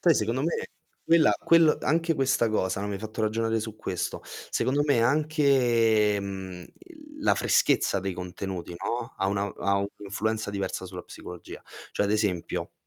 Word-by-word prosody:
Poi 170 -3 +5
secondo 115 +5 0
me 165 - -1 0.4
quella 165 -1 +5
quel 165 -2 +4
anche 165 +1 +2
questa 135 -4 +2
cosa, 100 -3 0
no, 105 - -3
mi 100 - -3
hai - - -4
fatto 110 +2 -6
ragionare 110 +1 0
su 110 -1 -6
questo 90 -4 -4
secondo 140 +3 -1
me 140 -6 +3
anche, 120 -7 +3
mhmm, 95 -2 -6 0.2
il 340 -4 -15 0.2
la - - +3
freschezza 485 - +2
dei 95 0 -3
contenuti, 90 0 -6
no, 120 +5 -3
ha 95 - 0
una 100 +1 0
ha 100 0 +1
un' 100 - 0
influenza 110 +1 -2
diversa 100 -1 -3
sulla - - -7
psicologia. 90 -1 -10 0.3
Cioè, - - +1
ad 100 - +1
esempio, 105 -5 -1
110 Hz, 170 wpm, -27 LUFS, 100-140 Hz, 0.4 s, Poi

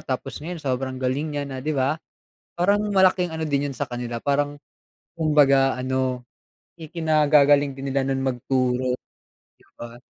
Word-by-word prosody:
tapos 135 +2 -5
ngayon 175 +3 -5
sobrang 130 -1 -2
galing 130 +4 -1
niya 145 - -1
na, 135 -2 -6
'di 150 +2 -2
ba? 140 +4 0 0.5
Parang 200 +4 +2
malaking 185 -2 +3
ano 160 -1 -3
din 140 -1 0
yun - - -13
sa 140 +2 -3
kanila, 120 -1 -5
parang 145 +1 -1 0.6
kumbaga 140 -4 +4
ano, 130 0 -2 0.6
ikinagagaling 150 -3 +3
din 135 0 -5
nila 135 0 0
nun 135 0 -1
magturo 130 -1 0
'di - - -13 0.6
ba? 120 0 -10
140 Hz, 150 wpm, -23 LUFS, 130-150 Hz, 0.6 s, kumbaga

